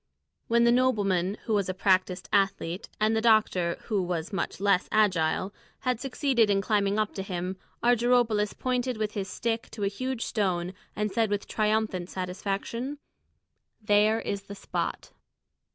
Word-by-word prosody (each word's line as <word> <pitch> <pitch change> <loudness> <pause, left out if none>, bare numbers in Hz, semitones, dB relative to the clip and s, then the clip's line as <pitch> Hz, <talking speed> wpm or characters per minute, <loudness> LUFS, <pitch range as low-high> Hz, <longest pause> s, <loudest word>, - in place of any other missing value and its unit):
When 235 +1 +4
the 235 - +5
nobleman, 205 -7 +2
who 225 - 0
was 200 -3 +1
a 185 - -2
practised 185 -1 +1
athlete, 195 -3 0
and 215 +1 +2
the 220 - +1
doctor, 215 -6 +3
who 210 -4 0
was 175 +1 -3
much 195 - -2
less 200 -2 +2
agile, 190 -2 +2 0.3
had 250 -3 0
succeeded 260 -4 +1
in 200 -1 +3
climbing 200 0 +1
up 215 -1 0
to 195 - -4
him, 185 -1 -3 0.3
Argyropoulos 240 -3 +3
pointed 255 -1 -1
with 215 -1 -1
his 200 -2 -3
stick 230 +3 -2
to 210 - -6
a - - +2
huge 255 +4 -3
stone 185 -4 -1 0.2
and 210 -1 -1
said 225 -1 +1
with 205 -1 -1
triumphant 215 -4 0
satisfaction, 200 +8 -3 0.8
"There 210 +1 +3
is 200 -3 -4
the 200 - -8
spot!" 195 - -4
210 Hz, 155 wpm, -28 LUFS, 190-225 Hz, 0.8 s, the